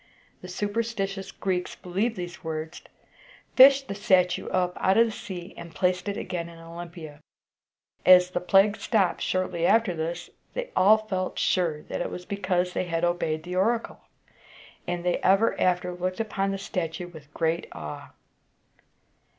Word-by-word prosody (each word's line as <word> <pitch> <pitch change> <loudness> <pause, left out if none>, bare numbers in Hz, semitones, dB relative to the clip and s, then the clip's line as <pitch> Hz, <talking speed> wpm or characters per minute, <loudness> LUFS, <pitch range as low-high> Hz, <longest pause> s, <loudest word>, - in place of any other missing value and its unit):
The 180 - -9
superstitious 205 0 -3
Greeks 180 -2 -2
believed 200 +6 -2
these 175 -1 -7
words, 160 +1 -5 0.7
fished 270 +1 +8
the - - -4
statue 185 -3 +2
up 180 -1 0
out 190 +2 +2
of 230 - +7
the 225 - -3
sea, 185 -3 -8
and 170 -2 -10
placed 180 +5 0
it 200 - -3
again 170 -1 -4
in 170 - -13
Olympia. 165 -2 -10 0.8
As 180 0 +7
the 175 - -1
plague 195 +3 +4
stopped 195 -7 +1
shortly 185 -2 -1
after 220 +1 +3
this, 170 +2 -4 0.2
they - - -4
all 210 +3 +6
felt 190 -4 -3
sure 165 -5 0
that - - -5
it - - -2
was 180 - -7
because 185 -2 -1
they - - -1
had 165 -1 -2
obeyed 160 -3 -1
the 180 +1 -5
oracle, 225 +5 0 0.9
and 175 0 -3
they 180 - +2
ever 195 +4 +3
after 180 0 +1
looked 185 +2 -3
upon 200 -3 -1
the 195 - -2
statue 175 -3 -4
with 155 -4 -14
great 165 +1 0
awe. 75 -1 -8
180 Hz, 160 wpm, -26 LUFS, 175-195 Hz, 0.9 s, fished